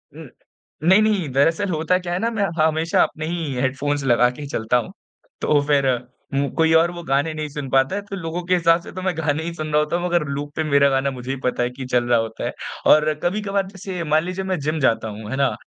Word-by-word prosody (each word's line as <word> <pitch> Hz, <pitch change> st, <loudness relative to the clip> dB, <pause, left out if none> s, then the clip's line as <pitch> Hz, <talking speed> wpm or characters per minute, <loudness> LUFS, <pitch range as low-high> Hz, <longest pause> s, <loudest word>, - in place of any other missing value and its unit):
उ, -, -, -10 dB, 0.6 s
नहीं, 190 Hz, +5 st, +6 dB
नहीं। 205 Hz, -8 st, +1 dB
दरअसल 165 Hz, +9 st, +2 dB
होता 165 Hz, +2 st, +1 dB
क्या 175 Hz, -1 st, -4 dB
है 175 Hz, -, -1 dB
ना, 230 Hz, -, 0 dB
मैं 205 Hz, -3 st, 0 dB, 0.2 s
हमेशा 160 Hz, +1 st, +2 dB
अपने 155 Hz, -, -4 dB
ही 165 Hz, -4 st, -3 dB
हेडफ़ोन्स 140 Hz, +3 st, -1 dB
लगा 125 Hz, -1 st, +4 dB
के 125 Hz, +4 st, -9 dB
ही 145 Hz, -, -6 dB
चलता 115 Hz, -2 st, 0 dB
हूँ। 120 Hz, -, -3 dB, 0.5 s
तो 145 Hz, -1 st, +3 dB
फ़िर 140 Hz, -2 st, +3 dB, 0.5 s
ऊँ 140 Hz, 0 st, +1 dB
कोई 160 Hz, -1 st, +4 dB
और 165 Hz, +2 st, +4 dB
वो 175 Hz, -1 st, -7 dB
गाने 145 Hz, +1 st, 0 dB
नहीं 155 Hz, -1 st, -4 dB
सुन 145 Hz, -2 st, -6 dB
पाता 135 Hz, +5 st, +2 dB
है। 205 Hz, -, -2 dB
तो 200 Hz, -, -4 dB
लोगों 175 Hz, -1 st, -4 dB
के 180 Hz, -, +4 dB
हिसाब 170 Hz, 0 st, +3 dB
से -, -, -11 dB
तो 185 Hz, -, -6 dB
मैं 185 Hz, -1 st, 0 dB
गाने 160 Hz, 0 st, 0 dB
ही 170 Hz, -, -4 dB
सुन 155 Hz, -2 st, -5 dB
रहा 150 Hz, -, +5 dB
होता 150 Hz, +2 st, -1 dB
हूँ। 175 Hz, +1 st, -1 dB
मगर 175 Hz, -3 st, +1 dB
लूप 145 Hz, +1 st, -4 dB
पे 160 Hz, -, 0 dB
मेरा 140 Hz, -2 st, +4 dB
गाना 135 Hz, 0 st, +1 dB
मुझे 125 Hz, +1 st, -5 dB
भी -, -, -10 dB
पता 125 Hz, -, -2 dB
है 120 Hz, -, 0 dB
कि 130 Hz, +1 st, -8 dB
चल 125 Hz, -1 st, +1 dB
रहा 120 Hz, -1 st, +4 dB
होता 110 Hz, 0 st, -4 dB
है। -, -, -3 dB, 0.4 s
और 155 Hz, 0 st, +3 dB
कभी-कभार 195 Hz, +1 st, 0 dB
जैसे 190 Hz, -2 st, -6 dB
मान 155 Hz, 0 st, +2 dB
लीजिए 185 Hz, +2 st, -4 dB
मैं 185 Hz, -3 st, -1 dB
जिम 155 Hz, +2 st, -2 dB
जाता 115 Hz, -5 st, +1 dB
हूँ। 105 Hz, 0 st, -7 dB
है -, -, -1 dB
ना? 135 Hz, -2 st, +1 dB
155 Hz, 255 wpm, -21 LUFS, 135-175 Hz, 0.6 s, नहीं